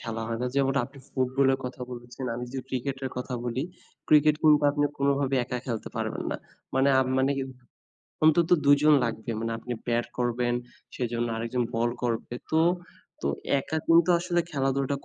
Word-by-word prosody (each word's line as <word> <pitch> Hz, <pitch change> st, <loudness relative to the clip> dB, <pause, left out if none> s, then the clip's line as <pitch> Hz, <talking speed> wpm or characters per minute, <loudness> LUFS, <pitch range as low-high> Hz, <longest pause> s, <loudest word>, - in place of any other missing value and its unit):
খেলা 115 Hz, -1 st, -4 dB
হয় 115 Hz, -, -2 dB
না। -, -, +1 dB
যেমন 135 Hz, -1 st, +2 dB
আপনি 140 Hz, 0 st, -13 dB
ফুটবলের 130 Hz, +1 st, +2 dB
কথা 125 Hz, 0 st, -6 dB
বলেছেন, 120 Hz, +1 st, -8 dB
আমি 125 Hz, -, -4 dB
যে 135 Hz, -, -3 dB
ক্রিকেটের 130 Hz, +1 st, -3 dB
কথা 125 Hz, 0 st, -3 dB
বলি। 125 Hz, +2 st, -1 dB, 0.5 s
ক্রিকেট 150 Hz, 0 st, +6 dB
কিন্তু 155 Hz, -1 st, +7 dB, 0.2 s
আপনি 145 Hz, 0 st, +1 dB
কোনোভাবে 140 Hz, -1 st, +1 dB
একা 125 Hz, 0 st, -3 dB
খেলতে 115 Hz, -4 st, -3 dB
পারবেন -, -, -2 dB
না। -, -, -2 dB, 0.4 s
মানে, 135 Hz, +1 st, +4 dB
আপ 130 Hz, -, +1 dB
মানে 135 Hz, +1 st, +3 dB, 0.9 s
অন্তত 160 Hz, +2 st, +5 dB, 0.2 s
দুজন 145 Hz, +2 st, +6 dB
লাগবে। 115 Hz, 0 st, -3 dB
মানে 115 Hz, 0 st, -2 dB
আপনি 120 Hz, +2 st, -5 dB
ব্যাট 120 Hz, 0 st, +1 dB
করবেন, 120 Hz, 0 st, 0 dB, 0.4 s
সেজন্য 120 Hz, -1 st, -1 dB
আরেকজন 115 Hz, +2 st, -1 dB
বল 115 Hz, +1 st, +2 dB
করবে। 120 Hz, 0 st, -2 dB, 0.2 s
তো, 160 Hz, -, +4 dB, 0.6 s
তো -, -, 0 dB, 0.3 s
একা 150 Hz, +3 st, -3 dB
কিন্তু 165 Hz, +1 st, +5 dB
আসলে 175 Hz, 0 st, 0 dB
খেলাধুলাটা 135 Hz, 0 st, 0 dB
130 Hz, 165 wpm, -27 LUFS, 120-140 Hz, 0.9 s, কিন্তু